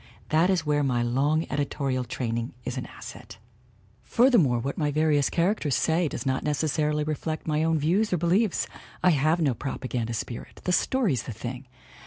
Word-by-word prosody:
That 160 +4 +3
is 180 -4 +1
where 150 0 +2
my 125 -4 +1
long 140 +7 +1
editorial 135 -2 -1
training 115 0 -3
is - - -3
an - - -4
asset. - - -11 0.6
"Furthermore, 230 - +4
what 135 +4 -3
my 150 -2 0
various 150 -1 +2
characters 170 - +1
say 165 +1 +2
does 145 - -5
not 130 0 0
necessarily 150 0 0
reflect 155 +1 -3
my 155 0 +1
own 165 0 +2
views 180 +9 +1
or 180 - +2
beliefs 180 +5 +2 0.4
I 180 - +6
have 155 +3 +2
no 145 -6 +2
propaganda 120 -2 -3
spirit 115 +1 -6
the 180 - 0
story's 190 - +1
the 120 - -7
thing. 125 +4 -7
150 Hz, 170 wpm, -26 LUFS, 130-165 Hz, 0.6 s, I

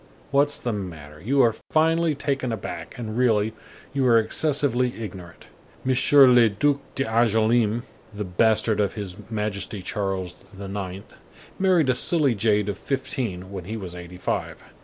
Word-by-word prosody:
What's 145 +1 +3
the 120 - -3
matter? 80 -7 -7
You 135 +7 +2
are 115 -2 +3 0.2
finely 160 0 +2
taken 135 -3 -2
aback, 85 -6 -6
and 110 -3 -5
really, 110 -3 +2 0.4
you 135 -2 +1
are 115 -1 +6
excessively 125 +1 +1
ignorant. 90 -6 -9 0.4
M. 130 - +3 0.2
le 125 -5 +7
Duc 140 +8 +1 0.2
d'Angoulême, 115 -2 +2 0.3
the 105 0 -5
bastard 110 +3 +2
of 100 -2 +1
his 100 -4 -6
Majesty 105 -2 -3
Charles 95 -3 -3 0.2
IX., 100 -1 -5 0.6
married 180 -8 +3
a - - +2
silly 145 0 +2
jade 105 -1 +1
of 100 -1 -3
fifteen 130 -9 -3
when 95 -3 -6
he 110 +4 -5
was 95 -4 -7
eighty 90 0 -9
five; - - -3
M. - - -20
110 Hz, 150 wpm, -24 LUFS, 100-130 Hz, 0.6 s, le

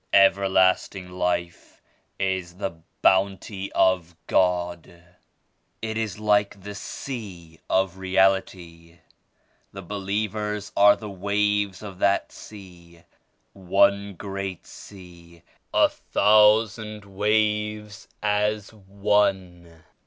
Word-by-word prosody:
"Everlasting 95 -1 +3
Life 90 -1 -3 0.4
is 95 -2 -2
the 95 0 -3 0.3
Bounty 95 +1 +1
of 90 -3 +1
God. 85 -2 -1 0.8
It 110 0 -4
is 110 -4 -3
like 105 -1 +1
the 100 +2 -8
Sea 100 - -8
of 95 -1 0
Reality. 95 -3 0 0.7
The 95 0 -9
believers 105 +2 -3
are 100 +1 +6
the 110 - -9
waves 100 0 -1
of 95 -3 -9
that 100 0 +1
Sea; 85 -5 -14 0.5
one 100 +1 +1
great 95 -1 -6
Sea 85 -3 -14 0.3
and - - +3
a - - +1
thousand 105 0 +2
waves 105 +1 -1 0.2
as 105 0 0
one. 95 -4 -1
100 Hz, 95 wpm, -24 LUFS, 90-105 Hz, 0.8 s, are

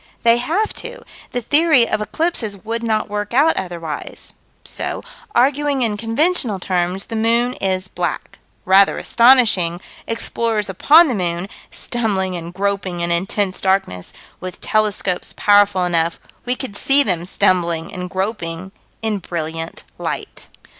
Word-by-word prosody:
They 235 0 +5
have 335 - -1
to: - - -9 0.3
the 245 - -3
theory 290 -2 +4
of 215 - -1
eclipses 225 -4 -2
would 230 +1 -2
not 220 -2 0
work 205 +2 -4
out 305 +5 +4
otherwise. 170 -5 -5 0.3
So, - - -4 0.3
arguing 275 +1 +2
in 220 -3 0
conventional 230 - +1
terms, 180 +1 -1
the 225 - -6
moon 235 +3 +2
is 185 -1 0
black. 175 -1 -4 0.3
Rather 195 +1 +5
astonishing 230 -9 +4 0.3
explorers 225 -2 -1
upon 305 - +6
the 260 - -1
moon 175 -2 -2 0.2
stumbling 195 -6 -2
and 170 0 -6
groping 190 -2 -2
in 170 0 0
intense 190 +2 0
darkness 190 - 0 0.3
with 185 -1 -7
telescopes 205 -4 0
powerful 205 -3 +4
enough, 170 -1 0 0.3
we 250 - +1
could 255 -6 -6
see 275 +6 +5
them 180 -7 0
stumbling 170 -3 +1
and 180 0 -5
groping 190 -2 -4 0.3
in 215 -2 0
brilliant 165 -2 -5 0.2
light. - - -5
205 Hz, 135 wpm, -19 LUFS, 180-235 Hz, 0.3 s, upon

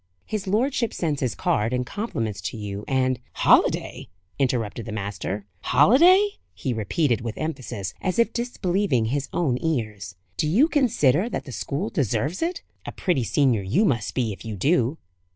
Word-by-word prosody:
"His 210 -2 -4
lordship 235 +3 0
sends 155 -5 -1
his 125 -4 -1
card 105 +3 0
and 125 0 -1
compliments 115 - -3
to - - -9
you, 100 -1 -5
and 130 -1 +1
" - - -39
"Holiday!" - - +3 0.3
interrupted 120 -4 -1
the - - -4
master. 100 -1 -4
"Holiday!" 345 - +5 0.2
he 130 - -2
repeated, 120 - 0
with 115 -1 -5
emphasis, 125 -10 -4
as 185 +3 -1
if 235 - +2
disbelieving 195 - 0
his 140 +4 -2
own 135 -8 0
ears. 110 - -2 0.2
"Do 155 - +1
you 225 - +4
consider 225 - +2
that - - -4
the 130 - -8
school 150 - -3
deserves 140 - -1
it? 335 +1 -2 0.2
A - - -6
pretty 175 - 0
senior 125 -2 +2
you 110 - +2
must 115 - 0
be, 115 -5 0
if - - -12
you 110 -2 -5
do." 135 - +1
135 Hz, 170 wpm, -24 LUFS, 110-190 Hz, 0.3 s, Holiday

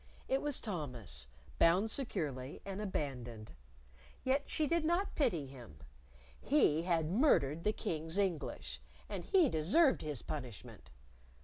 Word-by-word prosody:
It 265 +1 +1
was 295 -2 -1
Thomas, 125 - -5 0.3
bound 190 +6 +4
securely, 150 - -2
and 195 +1 -4
abandoned. 125 - -4 0.7
Yet 275 +2 +1
she 310 - +1
did 335 +2 +1
not 345 +5 +1
pity 225 - +1
him. 125 - -12 0.6
He 210 - +3
had 165 -2 +1
murdered 170 - +3
the 210 - +3
King's 165 -5 -3
English, 185 -6 -2 0.3
and - - -4
he 370 -6 +4
deserved 255 - +4
his 150 -5 -3
punishment. 125 -8 -7
170 Hz, 125 wpm, -35 LUFS, -, 0.7 s, bound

